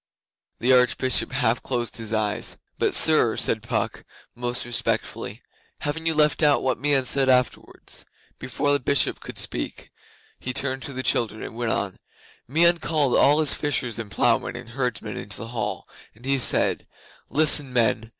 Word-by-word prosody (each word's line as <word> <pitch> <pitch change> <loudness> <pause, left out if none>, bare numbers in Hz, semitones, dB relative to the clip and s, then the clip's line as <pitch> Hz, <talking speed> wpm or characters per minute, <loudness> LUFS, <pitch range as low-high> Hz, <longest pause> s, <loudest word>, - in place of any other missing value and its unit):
The 125 +2 +3
Arch 125 -1 +4
bishop 130 0 +3
half 125 -3 +1
closed 120 -4 -3
his 110 -1 -7
eyes. 105 -1 -2 0.2
'But, - - +2
sir,' - - +5
said - - +1
Puck, - - -3 0.3
most 120 0 -2
respectfully, 120 -1 -2 0.4
'haven't 160 +3 -3
you 160 - +1
left 150 0 +2
out 145 -2 +3
what 130 -3 0
Meon 140 -1 +2
said 135 +1 +3
afterwards?' 125 -1 -1 0.4
Before 145 +3 -1
the 145 - +2
Bishop 140 +1 +1
could - - -9
speak - - -4 0.5
he 125 - -4
turned 135 0 0
to - - -7
the 130 0 -4
children 110 -4 0
and - - -7
went 120 -1 -1
on: 100 -2 -2 0.5
'Meon 170 +5 +3
called 150 -6 +1
all 145 +3 +5
his 155 - 0
fishers 125 -6 -2
and 110 -2 -6
ploughmen - - +1
and - - -8
herdsmen 120 -4 -3
into 100 - -7
the 115 +2 -7
hall 120 -2 -4 0.3
and 120 +4 -16
he 135 0 +1
said: 120 - +1 0.4
"Listen, 145 -2 +3
men! 115 -2 +1
130 Hz, 170 wpm, -24 LUFS, 115-145 Hz, 0.5 s, sir